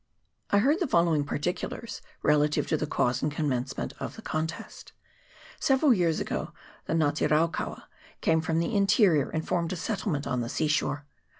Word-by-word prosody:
I 200 Hz, -, +3 dB
heard 280 Hz, -, +3 dB
the 350 Hz, -, 0 dB
following 170 Hz, -, +3 dB
particulars 180 Hz, +9 st, -4 dB, 0.2 s
relative 150 Hz, 0 st, +3 dB
to -, -, +2 dB
the 155 Hz, 0 st, -2 dB
cause 125 Hz, -3 st, 0 dB
and 150 Hz, -, 0 dB
commencement 135 Hz, -4 st, -2 dB
of -, -, -5 dB
the 225 Hz, -, -11 dB
contest: 160 Hz, +1 st, -5 dB, 0.7 s
Several 270 Hz, 0 st, +4 dB
years 170 Hz, -6 st, +1 dB
ago -, -, -3 dB, 0.3 s
the -, -, -2 dB
Nga 155 Hz, -3 st, +3 dB
te 150 Hz, -, 0 dB
raukaua 155 Hz, +3 st, 0 dB, 0.4 s
came 160 Hz, -1 st, +2 dB
from 160 Hz, 0 st, -1 dB
the 170 Hz, +7 st, 0 dB
in 200 Hz, -1 st, +3 dB
terior, 175 Hz, -, +4 dB
and 160 Hz, 0 st, -3 dB
formed 170 Hz, 0 st, 0 dB
a -, -, -2 dB
settlement 175 Hz, -5 st, -2 dB
on 125 Hz, -2 st, -1 dB
the 115 Hz, -, -3 dB
sea 155 Hz, -, 0 dB
shore. 145 Hz, -1 st, 0 dB
160 Hz, 180 wpm, -28 LUFS, 150-185 Hz, 0.7 s, Several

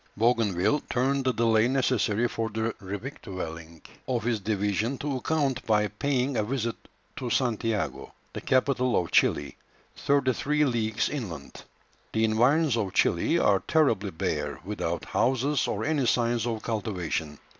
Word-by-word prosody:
Bougainville 115 Hz, +1 st, +2 dB
turned 135 Hz, +2 st, +1 dB
the 130 Hz, -, +3 dB
delay 115 Hz, -1 st, +3 dB
necessary 120 Hz, -4 st, +1 dB
for 115 Hz, -1 st, -3 dB
the 110 Hz, +1 st, -2 dB
revictualling 95 Hz, -, -7 dB, 0.2 s
of 120 Hz, -4 st, -1 dB
his 115 Hz, -1 st, 0 dB
division 105 Hz, +4 st, -1 dB
to 140 Hz, -1 st, -2 dB
account 140 Hz, -2 st, 0 dB
by 105 Hz, -1 st, +3 dB
paying 130 Hz, +4 st, -1 dB
a 110 Hz, -, +1 dB
visit 115 Hz, 0 st, -2 dB, 0.4 s
to 125 Hz, -, -3 dB
Santiago, 115 Hz, -3 st, -1 dB, 0.2 s
the -, -, -5 dB
capital 130 Hz, -1 st, +2 dB
of 85 Hz, -, -4 dB
Chili, 70 Hz, -, +2 dB, 0.4 s
thirty 140 Hz, -2 st, +2 dB
three 150 Hz, +4 st, +1 dB
leagues 115 Hz, -4 st, 0 dB
inland. 95 Hz, -, -6 dB, 0.5 s
The 110 Hz, -, +1 dB
environs 125 Hz, +5 st, +3 dB
of 100 Hz, -5 st, -2 dB
Chili -, -, +2 dB
are 100 Hz, -2 st, +3 dB
terribly 115 Hz, -, +2 dB
bare, 75 Hz, -4 st, -3 dB
without 85 Hz, -5 st, -3 dB
houses 135 Hz, +4 st, +1 dB
or -, -, -2 dB
any 145 Hz, -5 st, +1 dB
signs 120 Hz, -1 st, +1 dB
of 115 Hz, -2 st, -3 dB
cultivation. 90 Hz, -9 st, -3 dB
115 Hz, 140 wpm, -27 LUFS, 105-130 Hz, 0.5 s, the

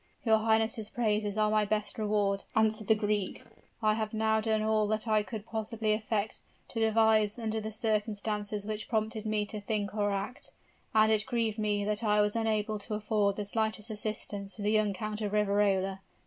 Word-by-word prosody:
"Your 220 Hz, -1 st, +5 dB
highness' 220 Hz, -1 st, +1 dB
praises 210 Hz, -3 st, 0 dB
are 215 Hz, 0 st, +2 dB
my 215 Hz, 0 st, +3 dB
best 210 Hz, +1 st, -1 dB
reward," 205 Hz, -2 st, 0 dB
answered 220 Hz, -1 st, +2 dB
the 220 Hz, -, +5 dB
Greek. 210 Hz, -2 st, -1 dB, 0.4 s
"I 215 Hz, 0 st, +4 dB
have 215 Hz, 0 st, -3 dB
now 220 Hz, 0 st, +2 dB
done 220 Hz, -1 st, +1 dB
all 215 Hz, -1 st, +2 dB
that 215 Hz, +2 st, -1 dB
I 215 Hz, -1 st, +3 dB
could 210 Hz, +1 st, -6 dB
possibly 220 Hz, -1 st, -1 dB
effect 215 Hz, 0 st, -2 dB, 0.3 s
or -, -, 0 dB
devise 220 Hz, -1 st, +3 dB
under 220 Hz, -1 st, -2 dB
the 215 Hz, -, -4 dB
circumstances 210 Hz, -1 st, -1 dB
which 215 Hz, 0 st, -4 dB
prompted 220 Hz, -1 st, -1 dB
me 215 Hz, -1 st, +1 dB
to 210 Hz, 0 st, -6 dB
think 205 Hz, -1 st, -2 dB
or 205 Hz, -1 st, +1 dB
act; 200 Hz, +6 st, -4 dB, 0.4 s
and 215 Hz, 0 st, +5 dB
it 215 Hz, +2 st, +2 dB
grieved 230 Hz, -4 st, 0 dB
me 205 Hz, -1 st, 0 dB
that 210 Hz, +2 st, 0 dB
I 210 Hz, -1 st, +3 dB
was 210 Hz, +1 st, +2 dB
unable 215 Hz, -1 st, 0 dB
to 205 Hz, +1 st, -4 dB
afford 210 Hz, -2 st, +1 dB
the 210 Hz, -, -4 dB
slightest 220 Hz, +1 st, -1 dB
assistance 205 Hz, -2 st, -4 dB
to 210 Hz, -, -7 dB
the 210 Hz, -, +2 dB
young 215 Hz, -1 st, +3 dB
Count 215 Hz, +3 st, -4 dB
of 205 Hz, -1 st, -2 dB
Riverola. 200 Hz, -2 st, +2 dB
215 Hz, 190 wpm, -30 LUFS, 210-220 Hz, 0.4 s, Your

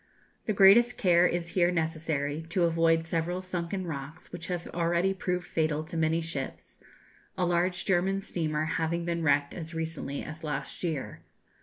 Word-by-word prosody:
The 215 Hz, -, +2 dB
greatest 210 Hz, +5 st, +6 dB
care 175 Hz, -1 st, +5 dB
is 170 Hz, -1 st, -2 dB
here 175 Hz, 0 st, +3 dB
necessary, 160 Hz, -3 st, -1 dB
to 175 Hz, +1 st, +1 dB
avoid 165 Hz, -1 st, +3 dB
several 165 Hz, +2 st, -1 dB
sunken 185 Hz, 0 st, -3 dB
rocks, 155 Hz, +1 st, -7 dB
which 170 Hz, -1 st, -6 dB
have 175 Hz, -1 st, -3 dB
already 170 Hz, +2 st, +1 dB
proved 180 Hz, -1 st, -2 dB
fatal 155 Hz, -1 st, 0 dB
to 160 Hz, -, -9 dB
many 160 Hz, +1 st, +2 dB
ships, 160 Hz, -5 st, -5 dB, 0.5 s
a 180 Hz, -, +2 dB
large 175 Hz, +1 st, +1 dB
German 190 Hz, +1 st, +2 dB
steamer 155 Hz, -4 st, -1 dB
having 165 Hz, +1 st, -1 dB
been 170 Hz, -1 st, -1 dB
wrecked 145 Hz, -2 st, +2 dB
as 165 Hz, -1 st, -7 dB
recently 160 Hz, -3 st, -4 dB
as 160 Hz, +1 st, -8 dB
last 145 Hz, +1 st, -4 dB
year. 160 Hz, -6 st, -3 dB
170 Hz, 160 wpm, -29 LUFS, 160-180 Hz, 0.5 s, greatest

